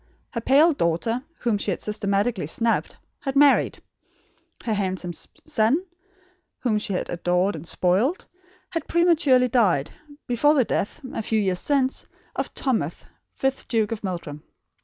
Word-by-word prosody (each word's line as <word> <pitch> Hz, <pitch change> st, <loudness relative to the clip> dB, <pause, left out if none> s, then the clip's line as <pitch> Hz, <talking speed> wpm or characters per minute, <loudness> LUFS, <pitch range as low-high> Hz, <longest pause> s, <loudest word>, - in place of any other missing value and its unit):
Her 230 Hz, -, -3 dB
pale 295 Hz, +7 st, +5 dB
daughter, 225 Hz, -, 0 dB, 0.2 s
whom 225 Hz, -4 st, +1 dB
she 205 Hz, -, -1 dB
had 185 Hz, -, -2 dB
systematically 200 Hz, -3 st, 0 dB
snubbed, 230 Hz, +8 st, 0 dB, 0.2 s
had 270 Hz, -1 st, -4 dB
married; 285 Hz, 0 st, +4 dB, 0.8 s
her 225 Hz, -, 0 dB
handsome 185 Hz, -3 st, -2 dB, 0.3 s
son, 245 Hz, +12 st, +2 dB, 0.8 s
whom 220 Hz, -4 st, +1 dB
she 205 Hz, -, -2 dB
had 180 Hz, -, -2 dB
adored 180 Hz, +3 st, 0 dB
and 160 Hz, +1 st, -8 dB
spoiled, 190 Hz, -, +1 dB, 0.5 s
had 330 Hz, -3 st, -3 dB
prematurely 310 Hz, -7 st, +4 dB
died, 195 Hz, -, +2 dB, 0.3 s
before 290 Hz, +5 st, +3 dB
the 260 Hz, -5 st, +4 dB
death, 200 Hz, -, -2 dB
a -, -, -2 dB
few 220 Hz, 0 st, 0 dB
years 190 Hz, -3 st, 0 dB
since, 275 Hz, -2 st, 0 dB, 0.3 s
of -, -, -2 dB
Thomas, 260 Hz, -5 st, 0 dB, 0.4 s
fifth 270 Hz, 0 st, -1 dB
Duke 220 Hz, -3 st, +1 dB
of 220 Hz, -2 st, -4 dB
Meldrum. 170 Hz, -6 st, -5 dB
225 Hz, 140 wpm, -24 LUFS, 190-265 Hz, 0.8 s, pale